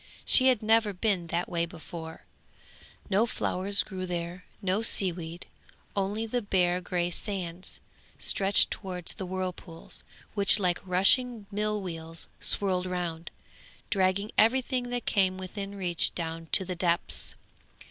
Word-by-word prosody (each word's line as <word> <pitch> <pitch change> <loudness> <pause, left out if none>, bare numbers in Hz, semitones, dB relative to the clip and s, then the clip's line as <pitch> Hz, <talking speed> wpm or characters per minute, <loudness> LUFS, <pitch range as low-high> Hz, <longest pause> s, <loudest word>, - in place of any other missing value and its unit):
She 260 - +5
had 250 -5 +3
never 220 -1 +4
been 185 -3 0
that 170 +2 -1
way 170 -1 -1
before; 160 -1 -9 0.9
no 210 +5 +4
flowers 200 -2 +2
grew 185 -2 -5
there, 175 +1 -4
no 195 +1 0
seaweed, 175 -5 +1 0.5
only 205 +3 0
the 245 +2 -1
bare 180 -3 +2
grey 175 -1 -1
sands, 180 -2 -4 0.4
stretched 195 +1 +3
towards 180 -4 -3
the 190 - -6
whirlpools, 180 -2 -5 0.3
which 200 -1 +5
like 180 -4 +1
rushing 205 +5 +3
mill 210 +1 0
wheels 165 -2 -5
swirled 185 -2 +1
round, 175 -2 -3 0.6
dragging 195 +1 +1
everything 245 +2 +3
that 245 -1 -3
came 190 -2 +2
within 195 +2 -6
reach 180 -4 0
down 165 -1 -3
to 190 - +5
the 180 0 -4
depths. 175 0 -1
185 Hz, 130 wpm, -29 LUFS, 175-205 Hz, 0.9 s, She